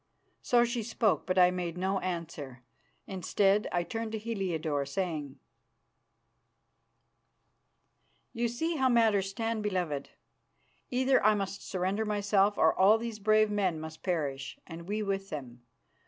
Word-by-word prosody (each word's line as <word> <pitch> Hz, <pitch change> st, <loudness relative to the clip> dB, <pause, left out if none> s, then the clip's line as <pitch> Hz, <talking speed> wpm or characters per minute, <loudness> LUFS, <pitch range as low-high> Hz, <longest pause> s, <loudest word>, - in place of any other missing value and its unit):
So 240 Hz, -1 st, +4 dB
she 240 Hz, 0 st, -2 dB
spoke, 215 Hz, -, 0 dB
but 185 Hz, 0 st, 0 dB
I 180 Hz, -1 st, +6 dB
made 180 Hz, -2 st, -4 dB
no 190 Hz, +2 st, 0 dB
answer. 160 Hz, -8 st, -5 dB, 0.4 s
Instead, 195 Hz, +2 st, +1 dB
I 175 Hz, -1 st, +1 dB
turned 225 Hz, +5 st, -4 dB
to -, -, -1 dB
Heliodore, 180 Hz, -10 st, -2 dB
saying, 155 Hz, -4 st, -3 dB, 3.0 s
"You 235 Hz, +1 st, 0 dB
see 320 Hz, +8 st, -2 dB
how 265 Hz, -2 st, +3 dB
matters 220 Hz, -5 st, +3 dB
stand, 225 Hz, +2 st, -2 dB
beloved. 180 Hz, -9 st, -2 dB, 0.8 s
Either 260 Hz, 0 st, +2 dB
I 215 Hz, +1 st, +5 dB
must 195 Hz, -1 st, -3 dB
surrender 190 Hz, +3 st, -1 dB
myself, 205 Hz, -1 st, +2 dB
or -, -, +4 dB
all 200 Hz, +4 st, +5 dB
these 225 Hz, -1 st, -5 dB
brave 215 Hz, +1 st, +3 dB
men 190 Hz, -6 st, 0 dB
must 160 Hz, 0 st, -8 dB
perish, 145 Hz, -6 st, -2 dB
and 170 Hz, +1 st, -9 dB
we 210 Hz, +1 st, -1 dB
with 195 Hz, -1 st, -2 dB
them. 125 Hz, -5 st, -7 dB
195 Hz, 135 wpm, -30 LUFS, 170-215 Hz, 3.0 s, I